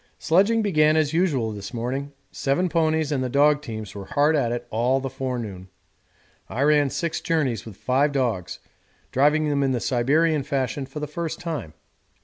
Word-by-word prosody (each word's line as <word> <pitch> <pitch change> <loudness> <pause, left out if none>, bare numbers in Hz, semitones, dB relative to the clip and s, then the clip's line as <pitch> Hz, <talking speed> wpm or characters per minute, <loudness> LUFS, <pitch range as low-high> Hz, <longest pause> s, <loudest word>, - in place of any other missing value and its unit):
Sledging 205 +7 +3
began 155 -6 +3
as 155 -1 +1
usual 145 -10 +1
this 100 +2 -7
morning; 130 +5 -3 0.2
seven 175 +7 0
ponies 160 -2 +1
and 135 -3 0
the 130 - -2
dog 145 +3 +4
teams 110 -7 -7
were 100 -1 -7
hard 150 +6 +2
at 120 -6 +1
it 120 - -3
all 125 +4 +2
the 135 -1 -5
forenoon. 120 -8 -5 0.8
I 130 - -1
ran 145 -1 +4
six 170 +4 -2
journeys 135 - -1
with 100 -4 -10
five 135 +3 +1
dogs, 120 -10 -1 0.5
driving 150 +3 +3
them 145 -1 +1
in 135 -1 +1
the 125 - 0
Siberian 145 +7 +2
fashion 135 -1 -2
for 135 +3 -7
the 150 - -2
first 160 +2 -4
time. 155 - -5
140 Hz, 175 wpm, -24 LUFS, 120-155 Hz, 0.8 s, dog